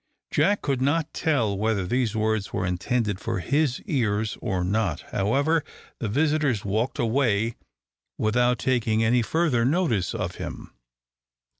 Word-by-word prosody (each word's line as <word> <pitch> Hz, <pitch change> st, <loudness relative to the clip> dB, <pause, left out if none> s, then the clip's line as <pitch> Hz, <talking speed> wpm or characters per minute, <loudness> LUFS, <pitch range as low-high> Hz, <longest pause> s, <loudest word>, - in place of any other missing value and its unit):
Jack 205 Hz, +1 st, +2 dB
could 135 Hz, -3 st, 0 dB
not 150 Hz, +3 st, +1 dB
tell 130 Hz, -, +1 dB
whether 105 Hz, -1 st, 0 dB
these 120 Hz, +2 st, 0 dB
words 110 Hz, -2 st, 0 dB
were -, -, -1 dB
intended 100 Hz, +3 st, -1 dB
for 115 Hz, 0 st, -2 dB
his 140 Hz, -, +1 dB
ears 110 Hz, -, 0 dB
or 95 Hz, -6 st, -1 dB
not. 95 Hz, -4 st, 0 dB
However, 140 Hz, +10 st, +1 dB, 0.4 s
the 115 Hz, -, -2 dB
visitors 145 Hz, -3 st, +1 dB
walked 110 Hz, +6 st, -1 dB
away 115 Hz, -2 st, +1 dB, 0.6 s
without 120 Hz, +3 st, +2 dB
taking 115 Hz, -3 st, +1 dB
any 120 Hz, +2 st, +3 dB
further 145 Hz, -1 st, +1 dB
notice 130 Hz, -, +1 dB
of -, -, -3 dB
him. -, -, -7 dB
115 Hz, 135 wpm, -25 LUFS, 105-140 Hz, 0.6 s, any